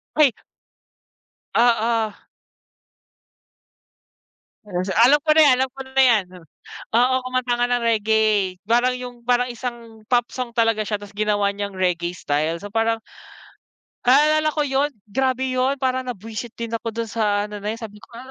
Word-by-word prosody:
Ay. 290 -5 +5 1.2
Oo. 230 -2 +2 2.5
Hmm, 180 -2 -2
sa 190 - -4 0.2
alam 290 +2 +4
ko 310 - 0
na 315 - +7
yan 270 - +6
alam 265 - -1
ko 270 +1 -13
na 265 0 +2
yan, 225 -6 +4
ne. 180 0 -14 0.5
Oo, 245 +3 +3
kumanta 255 -1 -1
ka 240 - +1
ng 245 -1 +1
reggae. 215 -4 +2
Parang 245 +2 +2
yung 245 -1 -9
parang 245 +1 +2
isang 235 -2 -7
pop 240 -1 +3
song 250 -2 -4
talaga 225 -2 +1
siya 210 0 -2
tapos 205 0 -13
ginawa 205 -1 0
niyang 200 -2 -5
reggae 175 -2 0
style 155 0 -1
so 205 - -9
parang 225 +1 0 1.1
Naalala 305 +3 +4
ko 300 - +1
yun, 280 +1 0 0.2
grabe 260 +2 0
yun 255 +2 +1
para 260 -1 -2
na 250 - -3
bwisit 225 +3 -8
din 230 -1 -6
ako 230 -1 -4
dun 230 -2 -4
sa 205 -2 0
ano 210 0 -8
na 210 +2 -3
yan 230 - -11
sabi 210 -1 -8
ko - - -16
"A 255 +3 -10
230 Hz, 165 wpm, -22 LUFS, 210-255 Hz, 2.5 s, na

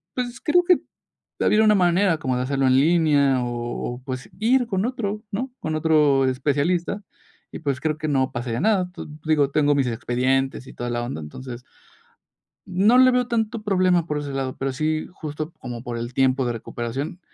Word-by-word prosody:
pues 250 0 -4
creo 355 +3 +3
que, 360 0 +4 0.6
habría 215 +1 +4
una 215 -1 +5
manera 180 -1 +3
como 130 -4 -1
de - - -1
hacerlo 135 +1 0
en 130 - +4
línea 145 -3 +3
o 120 0 -4 0.2
o 125 - -13
pues, 130 -1 -6
ir 245 +3 +3
con 195 -2 0
otro, 215 -4 -3
¿no? 255 +6 -3
Con 155 0 -3
otro 150 -4 +3
especialista 150 +9 0 0.5
y - - -7
pues 140 -3 -2
creo 155 0 -1
que 155 - -4
no 135 -2 +1
pasaría 120 -1 -3
nada. 190 -5 +2
Tu 175 - -8 0.2
digo, 150 -3 +3
tengo 145 0 +3
mis 135 -3 +1
expedientes 130 +3 -1
y - - -11
toda 120 - -5
la 120 0 -1
onda, 120 -9 -5
entonces 125 - -8 1.0
no 205 +7 +4
le 255 0 +7
veo 250 -1 +1
tanto 225 -1 -1
problema 185 -4 +2
por 150 -3 -2
ese 145 -1 -5
lado, 135 -1 -3
pero 135 0 -2
sí 155 +3 -1
justo 155 0 -6
como 120 -2 -7
por 120 -2 -4
el 120 +1 -5
tiempo 130 0 +2
de 120 - -1
recuperación, 120 +8 -5
150 Hz, 190 wpm, -23 LUFS, 130-190 Hz, 1.0 s, le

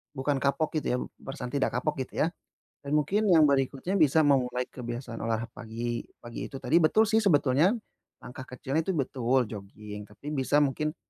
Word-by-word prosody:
bukan 140 +1 0
kapok, 150 +3 +1
gitu 145 - -5
ya, 125 - +1 0.3
perasaan 125 -2 -6
tidak 140 -4 0
kapok, 150 +2 -2
gitu - - -2
ya, - - +2 0.6
dan 140 - -5
mungkin 195 +9 +2
yang 160 -4 +7
berikutnya 140 +7 0
bisa 160 -2 +5
memulai 125 -3 +2
kebiasaan 120 -1 -6
olah 115 0 -1
pagi, 120 0 -4 0.2
pagi 120 0 -6
itu 135 - -7
tadi 130 +6 +3
betul 215 +8 +4
sih, 220 - +3
sebetulnya, 155 - +4 0.5
langkah 130 +1 -8
kecilnya 135 +4 -2
itu 190 - 0
betul, 130 -2 +1
joging, 105 0 -8
tapi 125 +8 -9
bisa 145 +1 +2
mungkin 150 +3 -1
135 Hz, 175 wpm, -28 LUFS, 125-150 Hz, 0.6 s, yang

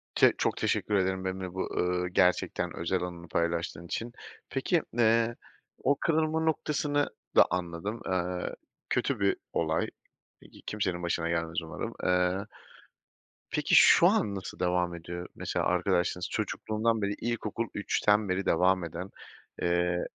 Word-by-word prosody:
Çe - - +6
çok - - 0
teşekkür 105 - 0
ederim 95 -1 +1
benimle 95 -1 -4
bu, 95 - -3
ııı, 90 0 0
gerçekten 90 0 +1
özel 85 +2 -1
anını 85 -1 -6
paylaştığın 85 0 -1
için. 115 +7 -4 0.4
Peki, 160 +5 +1 0.2
eee, 115 0 +3 0.5
o 140 +2 +4
kırılma 160 +1 +1
noktasını 150 -2 0 0.3
da - - +8
anladım. 90 +5 -3
Eee, 90 -1 -2 0.3
kötü - - 0
bir - - +2 0.2
olay, - - +1 0.5
e - - -16
ki - - -16
kimsenin 95 -4 -2
başına 85 -1 -1
gelmez 85 0 -1
umarım. 80 - -5
Eee, 90 +2 +2 1.1
peki, - - +2
şu - - +8
an 100 -1 +2
nasıl 95 - -7
devam 90 -1 +1
ediyor? 85 +1 -6
Mesela - - -2
arkadaşlığınız, 90 0 +1
çocukluğundan 110 +1 -1
beri 100 0 0
ilkokul 115 0 -3
3'ten 105 0 +2
beri 95 +1 0
devam 90 +2 +3
eden, 85 +3 -6 0.5
eee, 85 0 +1
90 Hz, 135 wpm, -29 LUFS, 85-110 Hz, 1.1 s, da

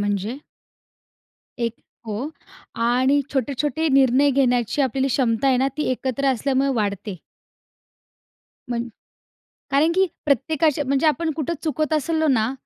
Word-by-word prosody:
म्हणजे. 205 +3 -2 1.2
एक 235 -1 -1 0.3
हो. 220 +7 -4 0.5
आणि 250 +4 +2
छोटे-छोटे 285 +4 -1
निर्णय 270 +1 +4
घेण्याची 250 -1 +1
आपली 265 +1 0
क्षमता 245 -2 +1
आहे 260 - +4
ना, 265 +2 +2
ती 300 - -1
एकत्र 260 +2 -2
असल्यामुळे 270 +2 0
वाढते. 200 -2 -2 1.5
म्हण 240 0 -2 0.8
कारण 290 +5 +3
की 380 +1 +4 0.2
प्रत्येकाच्या 300 +2 +1
म्हणजे 275 +3 +1
आपण 315 +2 +1
कुठे 315 +1 -2
चुकतं 310 0 0
असलो 315 +2 0
ना, 235 -3 +2
265 Hz, 120 wpm, -22 LUFS, 240-295 Hz, 1.5 s, निर्णय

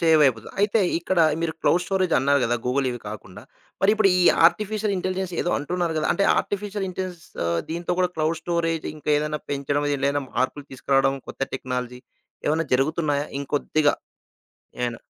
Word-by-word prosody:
సేవయిపోతుంది. 150 -9 +3
అయితే 205 +2 +3 0.2
ఇక్కడ 175 +2 -1 0.2
మీరు 165 -1 0
క్లౌడ్ 180 - +3
స్టోరేజ్ 185 -2 +1
అన్నారు 140 +2 +3
కదా! 120 +1 +1
గూగుల్ 135 +2 +1
ఇవి 120 -1 -6
కాకుండా. 100 -3 -9 0.4
మరి 195 - +6
ఇప్పుడు 215 -2 +4
ఈ - - +4 0.2
ఆర్టిఫిషియల్ 210 +3 0
ఇంటెలిజెన్స్ 185 0 -2
ఏదో 175 - -1
అంటున్నారు 170 +3 -2
కదా! 155 - 0
అంటే 200 - +1
ఆర్టిఫిషియల్ 205 0 -3
ఇంటెలిజెన్స్ 180 -2 -6 0.2
ఆహ్, 85 0 +1
దీంతో 170 +2 -2
కూడా 180 -1 +2
క్లౌడ్ 160 +1 0
స్టోరేజ్ 165 -2 -1
ఇంకా 150 0 -3
ఏదైనా 150 0 -2
పెంచడం 145 +1 -1
దీంట్లో 140 0 +1
ఏదైనా 145 0 -1
మార్పులు 140 +2 -1
తీసుకురావడం, 135 +1 +1
కొత్త - - -6
టెక్నాలజీ 125 -1 -4 0.5
ఏమన్నా 160 +2 +1
జరుగుతున్నాయా? 145 +1 +1
ఇంకొద్దిగా? 145 +1 +1 0.9
ఏవన్నా? 120 -1 -2
155 Hz, 160 wpm, -24 LUFS, 135-180 Hz, 0.9 s, మరి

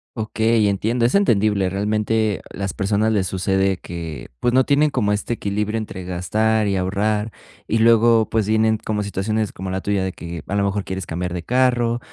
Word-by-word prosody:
Okey, 110 -1 +1
entiendo, 110 +5 0
es 120 - +1
entendible. 105 - +2
Realmente, 105 +1 0
las 100 -1 -4
personas 105 +2 +1
les 95 -3 +1
sucede 95 0 0
que, 85 -4 -7
pues, 120 - +1
no 130 +2 +4
tienen 145 +3 +3
como 105 -6 0
este 105 +3 -2
equilibrio 105 0 -2
entre 100 -4 -6
gastar 105 +5 0
y 100 - 0
ahorrar, 105 +3 -1 0.4
y 115 - +1
luego, 115 0 +5
pues 110 -2 0
vienen 110 0 +2
como 105 -1 -1
situaciones 105 +2 -2
como 95 +1 -6
la 95 +1 -2
tuya 100 -2 0
de 95 - -3
que, 85 -1 -7
a 100 - -2
lo 100 - +2
mejor, 100 0 -1
quieres 95 -1 -4
cambiar 90 +1 -4
de 85 - -4
carro, 120 -1 +1
105 Hz, 190 wpm, -21 LUFS, 95-110 Hz, 0.4 s, luego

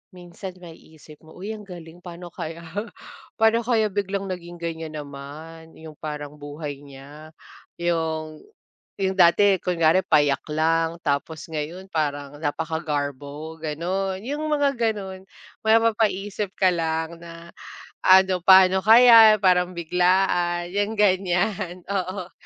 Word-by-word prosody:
minsan 180 +1 -9
maiisip 160 -2 -15
mo, 160 - -15
"Uy, 200 +4 -6
ang 210 -2 -10
galing 175 -2 -11
pa'no 175 0 -10
kaya 165 +1 -7 0.7
paano 225 +1 +3
kaya 220 -3 +2
biglang 195 0 -3
naging 175 -1 -7
ganyan 160 -2 -5
naman 150 +3 -10
yung 160 -1 -11
parang 150 -1 -6
buhay 145 -1 -7
niya. 140 +3 -13 0.5
Yung, 160 -2 -2 0.6
yung 190 0 0
dati 190 +3 +5
kunwari 170 0 +2
payak 145 -3 +2
lang 165 +2 +1
tapos 145 +2 -2
ngayon 160 +5 -5
parang 145 -2 -2
napakagarbo," 150 -1 -4
gano'n. 185 +5 -3
Yung 290 +5 -4
mga 285 -2 +1
gano'n. 200 -5 -3 0.4
Mapapaisip 210 -3 +1
ka 190 - +4
lang 160 0 -2
na 170 0 -11 0.6
ano, 190 0 +5
paano 190 0 +6
kaya? 225 -1 +8
Parang 180 -1 +3
biglaan, 175 0 +1
'yang 205 +2 -1
ganyan, 185 -2 0
oo. 185 -2 -3
175 Hz, 120 wpm, -23 LUFS, 160-190 Hz, 0.7 s, kaya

